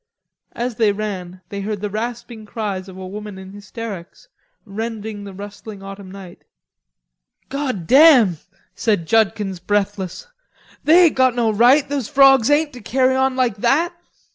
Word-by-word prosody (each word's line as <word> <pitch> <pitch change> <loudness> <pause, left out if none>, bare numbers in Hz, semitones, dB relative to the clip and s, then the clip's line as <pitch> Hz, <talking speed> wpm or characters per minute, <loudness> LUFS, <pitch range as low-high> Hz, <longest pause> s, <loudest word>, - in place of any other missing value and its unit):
As 240 -1 -4
they 220 -3 +3
ran, 190 -3 -5
they 200 -1 -5
heard 210 0 -3
the 210 +1 -3
rasping 230 +1 -5
cries 200 -4 -4
of 185 - -11
a 190 - -7
woman 205 +1 -8
in 190 0 -11
hysterics, 205 - -9 0.4
rending 215 0 -6
the 200 - -8
rustling 205 +1 -10
autumn 195 -1 -9
night. 190 -2 -12 1.1
"God 260 - -3
damn," 255 - +6 0.3
said 205 -7 0
Judkins 205 -2 +1
breathless, 200 - -2 0.6
"they 340 +4 +6
ain't 320 - +2
got 260 -2 +3
no 230 -2 +1
right, 245 +7 +4
those 275 -5 -3
frogs 270 -4 +5
ain't, 295 0 +2
to 250 - -10
carry 260 +3 +1
on 265 0 +1
like 250 -5 0
that." 295 - +1
215 Hz, 150 wpm, -20 LUFS, 195-255 Hz, 1.1 s, damn